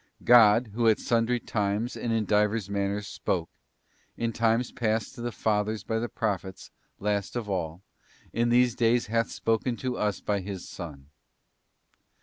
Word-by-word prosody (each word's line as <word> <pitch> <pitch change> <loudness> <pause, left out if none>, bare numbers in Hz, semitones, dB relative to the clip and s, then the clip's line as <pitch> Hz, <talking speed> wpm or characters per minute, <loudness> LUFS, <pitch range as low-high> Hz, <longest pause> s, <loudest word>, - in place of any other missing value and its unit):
' - - -21
God, 110 0 +6
who 115 +1 +1
at 110 - +4
sundry 120 +1 +1
times 105 +2 -1
and 120 - -3
in 110 -1 +1
divers 105 0 +1
manners 100 +1 -1
spoke, 85 -4 -2 0.7
in 115 0 -1
times 115 +2 +1
past 110 -2 -1
to - - -9
the 120 0 -2
fathers 105 -2 -1
by 110 0 -1
the 120 +1 -3
Prophets, 95 -4 -3 0.3
last 100 +1 -2
of 120 -3 -3
all, 90 -2 -3 0.5
in 120 +1 +1
these 120 0 +4
days 120 +1 +2
hath 115 +1 0
spoken 115 +2 -1
to 125 -1 -3
us 105 -2 0
by 105 -1 -1
His 95 -1 -6
Son. 70 -5 -9
110 Hz, 160 wpm, -27 LUFS, 100-115 Hz, 0.7 s, God